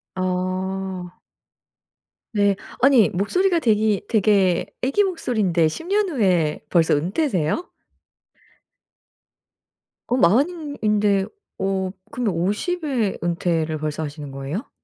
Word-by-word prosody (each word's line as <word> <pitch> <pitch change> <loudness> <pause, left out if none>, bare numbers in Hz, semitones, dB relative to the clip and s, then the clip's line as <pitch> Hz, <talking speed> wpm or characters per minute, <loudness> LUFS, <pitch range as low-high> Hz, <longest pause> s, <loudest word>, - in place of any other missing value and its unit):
아. 185 0 -3 1.2
네. 205 -2 +3 0.3
아니 255 -6 +6
목소리가 345 - +1
되기 215 -5 +2
되게 195 -5 +3 0.2
아기 275 +11 +3
목소리인데 215 - +1
10 330 - -7
년 405 0 +1
후에 180 - +1
벌써 165 -4 +3
은퇴세요? 185 - -1 2.4
어 245 - +2
40 240 - +4
인 310 -5 -7
인데 210 -2 +2 0.3
어 190 -1 -1 0.2
그러면 235 -6 -1
50 210 - -1
에 235 -9 0
은퇴를 165 -2 -1
벌써 155 +1 -3
하시는 145 -1 -7
거예요? 135 - -5
195 Hz, 195 characters per minute, -22 LUFS, 175-250 Hz, 2.4 s, 아니